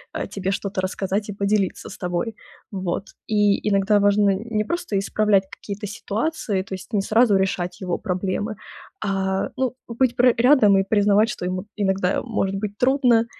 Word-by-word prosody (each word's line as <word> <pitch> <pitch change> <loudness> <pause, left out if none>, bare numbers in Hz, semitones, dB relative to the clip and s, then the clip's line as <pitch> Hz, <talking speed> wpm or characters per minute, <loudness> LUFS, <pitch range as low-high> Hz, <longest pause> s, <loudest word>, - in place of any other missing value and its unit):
э, - - -3
тебе 195 -1 -2
что-то 195 -1 -2
рассказать 195 +2 -2
и - - -3
поделиться 200 -1 0
с 210 - -10
тобой. 180 +5 -2 0.4
Вот. 190 -2 -2 0.2
И 205 -2 +2
иногда 205 +1 +3
важно 205 0 +4
не 215 +1 -2
просто 345 - -3
исправлять 200 0 +2
какие-то 205 0 -7
ситуации, 215 -1 -2
то 190 - -9
есть 185 +5 -12
не 205 - +2
сразу 215 0 +4
решать 180 -2 -1
его 180 -2 -1
проблемы, 195 +3 -2 0.5
а 190 -1 -1
ну, 255 -1 -1
быть 240 +1 +1
пр 250 0 +5
рядом 230 -5 +5
и - - +2
признавать, 205 +2 +3
что 180 - -4
ему 185 +1 -3
иногда 190 -2 0
может 200 -5 -1
быть 205 +1 -4
трудно, 250 -3 +4
205 Hz, 165 wpm, -23 LUFS, 190-220 Hz, 0.5 s, пр